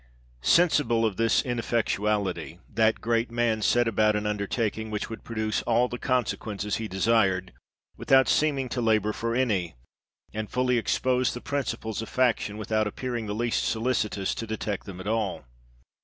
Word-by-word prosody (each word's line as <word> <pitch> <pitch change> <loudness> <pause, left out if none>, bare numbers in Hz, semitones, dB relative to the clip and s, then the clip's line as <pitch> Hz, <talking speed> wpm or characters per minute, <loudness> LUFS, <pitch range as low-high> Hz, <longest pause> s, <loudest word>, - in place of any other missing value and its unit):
Sensible 120 - +3
of 105 -4 -1
this 115 0 +3
ineffectuality, 105 - -1 0.2
that 110 +1 +2
great 115 0 +1
man 115 -2 0
set 120 +2 +3
about 110 -1 +3
an 105 0 -1
undertaking, 105 +1 -2
which 105 +1 -4
would 115 - -7
produce 110 -2 -2
all 120 +2 +2
the 120 0 -6
consequences 110 -5 -1
he 110 - -4
desired, 95 -2 +1 0.4
without 130 -1 +4
seeming 140 -4 +2
to 120 - -2
labour 110 -2 +2
for 115 +1 -2
any, 100 - 0 0.6
and 110 0 -4
fully 125 -1 +1
expose 125 +2 +1
the - - -4
principles 120 -6 -3
of 115 - -7
faction, 120 -5 +1
without 110 0 0
appearing 120 +1 -4
the 105 - -3
least 120 +1 0
solicitous 110 -4 0
to 115 - -5
detect 105 -2 -4
them 95 -2 -8
at 95 - -7
all.. 110 - -1
110 Hz, 155 wpm, -27 LUFS, 105-120 Hz, 0.6 s, without